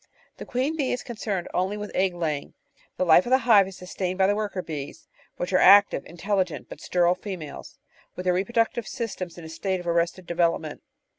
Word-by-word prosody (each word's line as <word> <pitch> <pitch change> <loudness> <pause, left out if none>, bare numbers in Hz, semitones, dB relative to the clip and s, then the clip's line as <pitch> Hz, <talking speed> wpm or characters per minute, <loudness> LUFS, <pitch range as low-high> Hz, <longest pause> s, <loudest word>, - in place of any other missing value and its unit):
The - - -9
queen 260 +6 -1
bee 280 -5 -1
is 250 - -2
concerned 210 -6 -4
only 190 +3 0
with 210 0 -6
egg 185 -1 +1
laying; 155 -4 -3 0.4
the 185 - +1
life 175 +5 +6
of - - -2
the 260 - +6
hive 205 -5 +6
is 190 - -10
sustained 185 0 -4
by 190 - +4
the 200 - +3
worker 205 -3 -3
bees, 145 -3 -7 0.3
which 175 +2 -3
are 185 - +5
active, 200 -7 +6
in 170 - -13
telligent, 185 -2 -1
but - - -10
sterile 175 -1 +2
females, 180 -5 -8 0.4
with 180 - -5
their 180 -1 +2
reproductive 230 +4 0
systems 200 -8 -5
in 170 - -9
a - - -8
state 185 +3 -2
of 175 - -9
arrested 170 +2 0
development. 170 -3 -1
185 Hz, 205 wpm, -25 LUFS, 175-205 Hz, 0.4 s, life